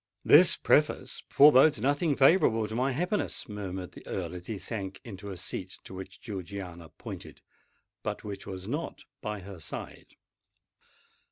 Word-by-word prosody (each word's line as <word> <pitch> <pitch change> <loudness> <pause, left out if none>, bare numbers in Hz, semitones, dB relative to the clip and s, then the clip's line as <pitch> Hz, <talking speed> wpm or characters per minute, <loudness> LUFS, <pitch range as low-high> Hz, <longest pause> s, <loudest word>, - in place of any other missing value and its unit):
"This - - +8
preface - - +1
forebodes 145 -2 +7
nothing 145 +5 +1
favourable 130 - +4
to 110 - -7
my 130 +4 +1
happiness," 180 +10 -2
murmured 95 -3 -5
the - - -12
Earl, - - -3
as 90 0 -8
he 110 - -3
sank 95 -2 -5
into 100 -3 -8
a 95 - -6
seat 95 +1 -5
to - - -11
which 95 0 -9
Georgiana 95 -5 -7
pointed—but 80 - -10
which 100 -2 -7
was 95 0 -6
not 150 +8 -4 0.2
by 105 -2 -4
her 95 -1 -10
side! - - -8
100 Hz, 145 wpm, -29 LUFS, 95-130 Hz, 0.2 s, This